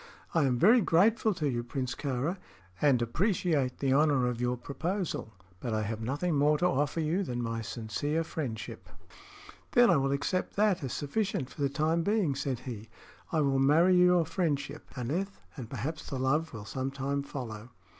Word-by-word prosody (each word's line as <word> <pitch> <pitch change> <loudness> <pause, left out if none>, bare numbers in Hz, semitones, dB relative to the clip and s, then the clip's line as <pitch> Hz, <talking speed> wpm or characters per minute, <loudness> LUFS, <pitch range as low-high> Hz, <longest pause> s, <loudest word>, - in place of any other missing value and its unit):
"I 160 -4 +3
am 125 -2 +1
very 225 - +6
grateful 215 +6 +3
to 155 -3 -1
you, 120 -3 -1
Prince 125 +1 -3
Kāra, 145 +6 -2 0.4
and 135 -5 +4
appreciate 155 - 0
the 135 -2 +1
honor 145 -3 +3
of 125 -1 -2
your 125 0 0
proposal; 165 - -3 0.3
but 115 0 -2
I 110 - 0
have 110 +1 -4
nothing 145 +9 -1
more 150 +1 +3
to 175 - 0
offer 145 -1 +1
you 165 +5 +1
than 125 -10 -3
my 115 -1 -2
sincere 115 +9 -2
friendship." 135 -9 -5 0.8
"Then 245 -5 +6
I 170 - +5
will 135 0 +1
accept 165 +7 -1
that 200 -5 +2
as 130 - -3
sufficient 145 - -2
for 150 - -9
the 140 - +2
time 155 +4 +1
being," 200 -5 +1
said 135 -2 -3
he. 115 -4 -7 0.4
"I 160 - +2
will 135 -2 +2
marry 160 +7 +5
your 180 -1 +5
friendship, 150 -5 -2
Aneth, 170 +11 -3 0.2
and 125 -7 -7
perhaps 150 +7 -5
the 135 - -3
love 150 +5 +1
will 105 -3 -8
some 130 +3 -3
time 140 +1 -2
follow." 120 -5 -7
140 Hz, 180 wpm, -30 LUFS, 125-170 Hz, 0.8 s, very